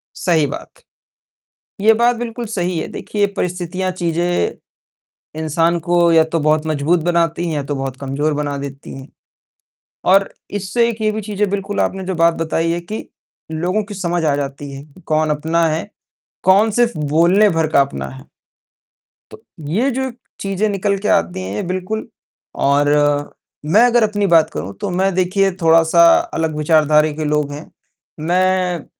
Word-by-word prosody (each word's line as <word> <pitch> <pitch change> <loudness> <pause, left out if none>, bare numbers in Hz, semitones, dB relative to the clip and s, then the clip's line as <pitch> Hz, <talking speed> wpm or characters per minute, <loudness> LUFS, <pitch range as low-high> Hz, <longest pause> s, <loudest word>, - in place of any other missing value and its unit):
सही 165 -4 +1
बात। - - -7 1.1
ये 220 +2 +6
बात 240 +2 +2
बिल्कुल 240 0 -5
सही 180 -5 -2
है, - - -3
देखिए 205 -1 -2
परिस्थितियाँ, 180 +1 -2
चीज़ें 170 - -1 0.8
इंसान 165 +2 +1
को 170 +1 +2
या 160 -1 +6
तो 160 +1 -2
बहुत 155 +1 +1
मजबूत 155 +3 +1
बनाती 170 0 0
हैं 160 - -2
या 145 - -2
तो 145 +1 -3
बहुत 135 -1 -4
कमजोर 140 +3 -2
बना 145 -1 -2
देती 140 0 -8
हैं 135 0 -10 1.1
और 195 0 +4 0.3
इससे 205 +5 +1
एक 230 -1 -5
ये 215 - +2
भी 215 - -3
चीज़ 205 -1 -7
है - - +4
बिल्कुल 200 0 -2
आपने 190 -1 -1
जो 190 - -3
बात 165 0 +3
बताई 165 0 -1
है 170 - -1
कि, 210 +6 -7 0.4
लोगों 180 +7 -1
की 205 - -9
समझ 175 -3 -2
आ 145 -2 +2
जाती 140 0 -5
है 135 0 -8
कि 150 +4 -19
कौन 155 0 +1
अपना 160 +3 +1
है, 160 +6 -3 0.5
कौन 200 +4 +4
सिर्फ़ 240 0 +1
बोलने 170 +8 +3
भर 165 -3 +1
का 140 - +5
अपना 70 - -3
है। 65 0 -12 1.1
तो - - -14 0.3
ये 230 - +1
जो 265 +1 -2 0.3
चीज़ें 195 +2 -1
निकल 200 0 0
के 210 - -3
आती 85 +2 +1
हैं 100 - -4
बिल्कुल 185 +4 -3 0.6
और 145 +1 +3 0.9
मैं 220 - +7
अगर 240 -1 +3
अपनी 205 -2 +1
बात 165 -3 +4
करूँ 100 - -6
तो - - -2
मैं 190 +2 +1
देखिए 185 +2 +2
थोड़ा-सा 165 - +5 0.4
अलग 160 -1 -1
विचारधारा 155 0 +3
के 155 +1 -4
लोग 150 -1 0
हैं। 145 +3 -9 0.5
मैं 180 +1 +1
अ, 145 - -14
170 Hz, 170 wpm, -18 LUFS, 150-195 Hz, 1.1 s, मैं